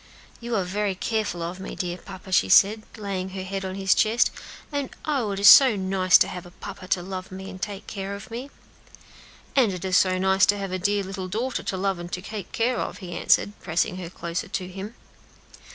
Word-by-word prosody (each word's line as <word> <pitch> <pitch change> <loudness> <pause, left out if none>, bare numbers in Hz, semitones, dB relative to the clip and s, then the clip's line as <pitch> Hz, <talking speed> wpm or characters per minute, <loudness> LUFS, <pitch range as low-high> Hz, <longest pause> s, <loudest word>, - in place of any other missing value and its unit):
"You 235 0 -3
are 195 - +1
very 200 +2 -1
careful 205 -4 -2
of 175 +3 -5
me, 190 - -7
dear 180 0 -3
papa," 190 -1 -11
she 95 - +3
said, 210 - +6 0.2
laying 195 -3 -3
her 190 - -3
head 195 +1 -4
on 190 0 -4
his 195 -1 +3
breast, 225 +3 +3 0.4
"and 285 -2 -2 0.2
oh! 270 -8 0
it 195 -1 -3
is 200 - +5
so 260 -1 +9
nice 190 -1 +4
to - - +3
have 180 - -6
a 175 - -12
papa 185 +1 -9
to 180 -1 0
love 185 0 -6
me 190 +1 -7
and 185 -1 -11
take 205 -2 -5
care 200 -1 -5
of 200 +2 -11
me." 250 +4 -6 1.1
"And 250 -7 +4
it 180 0 -5
is 185 -1 +1
so 185 -1 +3
nice 190 +1 +3
to 205 - +3
have 195 -2 -4
a 185 - -2
dear 205 +2 +1
little 190 -1 -5
daughter 235 +7 -2
to 190 - -3
love 190 -1 -1
and 175 0 -7
to 180 - -3
take 210 -2 -7
care 235 +1 0
of," - - -3
he 180 -3 -8
answered, 200 - +3
pressing 175 +1 -1
her 175 -3 -6
closer 170 +4 -4
to 185 -2 -4
him. 195 +5 -8
190 Hz, 225 wpm, -25 LUFS, 185-205 Hz, 1.1 s, so